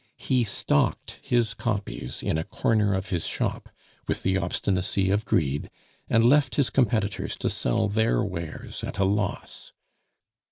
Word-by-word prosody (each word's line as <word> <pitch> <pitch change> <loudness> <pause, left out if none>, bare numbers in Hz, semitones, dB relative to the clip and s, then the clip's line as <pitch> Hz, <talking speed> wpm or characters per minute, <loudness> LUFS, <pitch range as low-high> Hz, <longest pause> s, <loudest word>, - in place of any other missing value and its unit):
He 130 -3 +1
stocked 105 - 0
his 120 -3 +1
copies 100 - -4
in - - 0
a - - -1
corner 105 +2 +1
of 95 +1 -3
his 85 -3 0
shop, - - -2 0.4
with - - -1
the 95 - +2
obstinacy 95 +1 0
of 105 +2 +1
greed, 70 -3 0 0.4
and 115 - +4
left 135 +2 +4
his 140 -3 +2
competitors 110 -6 0
to - - -1
sell 85 - 0
their 110 +2 +2
wares 85 -5 -6
at - - -5
a 95 - +3
loss. 100 0 -2
100 Hz, 150 wpm, -26 LUFS, 95-115 Hz, 0.4 s, and